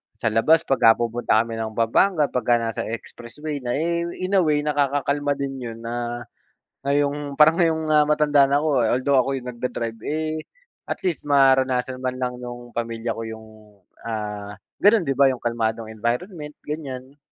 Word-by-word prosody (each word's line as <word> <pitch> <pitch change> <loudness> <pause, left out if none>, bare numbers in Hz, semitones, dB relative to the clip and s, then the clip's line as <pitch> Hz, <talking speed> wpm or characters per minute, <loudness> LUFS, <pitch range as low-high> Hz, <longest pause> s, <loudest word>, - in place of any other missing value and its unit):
sa 110 - -2
labas 155 +9 +4
'pag, 135 - +1
ah, - - +2
pupunta 115 -1 +1
kami 115 -1 -6
ng 110 -1 -3
Pampanga, 150 - +3
pagka 120 -1 +2
nasa 115 -1 -3
expressway 140 +6 -6
na, 120 0 -1
eh 170 +3 0 0.2
in 185 - -2
a - - +6
way, 150 -2 +2
nakakakalma 145 0 0
din 135 -1 -3
'yun, 115 -2 -7
na 120 0 -4 0.6
ngayong 145 0 0
parang 155 +2 +6
ngayong, 165 -2 +2
ah, 150 -1 +5
matanda 150 -2 +4
na 140 +1 +3
ako, 155 - 0 0.2
although 130 +2 +2
ako 130 - -3
yungnag-da-drive, 120 -2 -5
eh 155 +1 -2 0.5
at - - -3
least 175 -5 -1
maranasan 130 -2 +3
man 130 0 -2
lang 125 -1 -1
nung 120 0 -8
pamilya 115 0 -2
ko - - -4
'yung, 110 0 -8 0.6
ah, 105 -2 -4 0.3
ganun 210 0 +6
'di 135 - +1
ba 140 - +6
'yung 130 -2 -3
kalmadong 115 -1 -2
environment, 150 - -3
ganiyan. 140 -3 -6
130 Hz, 165 wpm, -23 LUFS, 115-150 Hz, 0.6 s, a